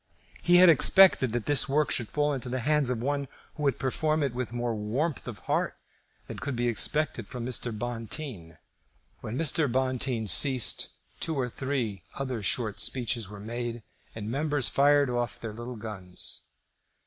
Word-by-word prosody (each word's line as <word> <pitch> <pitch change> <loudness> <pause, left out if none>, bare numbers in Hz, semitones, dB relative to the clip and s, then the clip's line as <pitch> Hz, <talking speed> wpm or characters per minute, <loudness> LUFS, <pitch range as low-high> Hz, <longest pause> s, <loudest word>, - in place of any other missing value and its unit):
He 175 - +4
had 180 +1 +8
expected 170 - +6
that 120 -1 -2
this 145 -2 +2
work 150 +1 +1
should 115 -4 0
fall 150 0 0
into 130 -2 -3
the 130 0 -2
hands 150 0 +2
of 120 -2 -2
one 140 0 -1 0.3
who 150 - -9
would 140 -4 +1
perform 155 +4 0
it 135 -4 -1
with 125 -1 -4
more 120 -1 -2
warmth 120 +9 -2
of - - -6
heart - - -1 0.5
than - - -8
could 140 -2 -4
be 120 +1 0
expected 120 0 +2
from 120 -2 -6
Mr. 125 -1 0
Bonteen. 115 - -6 0.6
When 110 +3 -5
Mr. 155 -3 +3
Bonteen 130 -2 -1
ceased, 130 +3 +2 0.3
two 160 - -2
or 125 -1 -1
three 120 -7 -3
other 130 -4 -4
short 110 +1 0
speeches 120 -5 -1
were 105 -1 -9
made 120 +2 -5 0.3
and 110 -2 -6
members 145 +2 0
fired 145 0 +4
off 120 -3 -2
their 110 -2 -6
little 120 +3 -7
guns. 105 -5 -4
125 Hz, 170 wpm, -28 LUFS, 115-145 Hz, 0.6 s, had